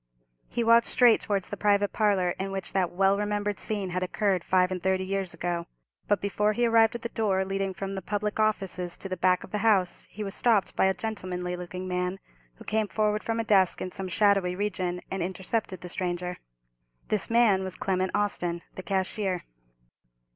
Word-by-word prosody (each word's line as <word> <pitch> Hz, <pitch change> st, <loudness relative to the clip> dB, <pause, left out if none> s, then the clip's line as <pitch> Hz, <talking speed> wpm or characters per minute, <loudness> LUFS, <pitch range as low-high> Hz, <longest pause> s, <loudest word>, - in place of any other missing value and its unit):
He 235 Hz, -, -1 dB
walked 230 Hz, 0 st, +5 dB
straight 245 Hz, -3 st, +5 dB
towards 200 Hz, -3 st, -2 dB
the -, -, -5 dB
private 205 Hz, -1 st, +2 dB
parlour 200 Hz, -5 st, +2 dB
in 195 Hz, +1 st, -3 dB
which 195 Hz, -1 st, -5 dB
that 185 Hz, -3 st, +2 dB
well 195 Hz, +2 st, +3 dB
remembered 205 Hz, 0 st, -1 dB
scene 200 Hz, -4 st, -3 dB
had 185 Hz, +1 st, -1 dB
occurred 185 Hz, 0 st, 0 dB
five 185 Hz, 0 st, +2 dB
and 185 Hz, -1 st, -3 dB
thirty 190 Hz, 0 st, +1 dB
years 195 Hz, -1 st, -2 dB
ago. 170 Hz, -1 st, -3 dB, 0.4 s
But 205 Hz, -2 st, +2 dB
before 210 Hz, +1 st, +1 dB
he 240 Hz, +2 st, +1 dB
arrived 225 Hz, -1 st, +4 dB
at 235 Hz, -, -6 dB
the 235 Hz, -, -3 dB
door 195 Hz, -5 st, 0 dB
leading 195 Hz, 0 st, -2 dB
from 195 Hz, +1 st, -4 dB
the 190 Hz, -, -4 dB
public 210 Hz, +3 st, -2 dB
offices 190 Hz, -5 st, 0 dB
to -, -, -6 dB
the 185 Hz, -, -3 dB
back 185 Hz, 0 st, +2 dB
of -, -, -12 dB
the 210 Hz, -, -1 dB
house, 200 Hz, -5 st, +2 dB
he 210 Hz, -, -6 dB
was 195 Hz, -1 st, -4 dB
stopped 220 Hz, -5 st, +2 dB
by -, -, +3 dB
a 190 Hz, 0 st, +2 dB
gentlemanly 180 Hz, -5 st, -4 dB
looking 180 Hz, +1 st, -6 dB
man, 180 Hz, +1 st, -1 dB, 0.4 s
who -, -, -13 dB
came 215 Hz, 0 st, 0 dB
forward 210 Hz, 0 st, 0 dB
from 225 Hz, 0 st, -1 dB
a -, -, +1 dB
desk 195 Hz, -4 st, +3 dB
in 185 Hz, -, -4 dB
some 190 Hz, +1 st, -4 dB
shadowy 195 Hz, -2 st, +3 dB
region, 185 Hz, -3 st, -2 dB
and 190 Hz, -, -2 dB
intercepted 190 Hz, +1 st, -3 dB
the 180 Hz, -, -7 dB
stranger. 180 Hz, 0 st, -3 dB, 0.7 s
This 210 Hz, -, +1 dB
man 230 Hz, -5 st, +4 dB
was 190 Hz, -1 st, -5 dB
Clement 185 Hz, -1 st, 0 dB
Austin, 180 Hz, -4 st, -1 dB
the -, -, -7 dB
cashier. 190 Hz, -1 st, -1 dB
195 Hz, 200 wpm, -27 LUFS, 185-210 Hz, 0.7 s, walked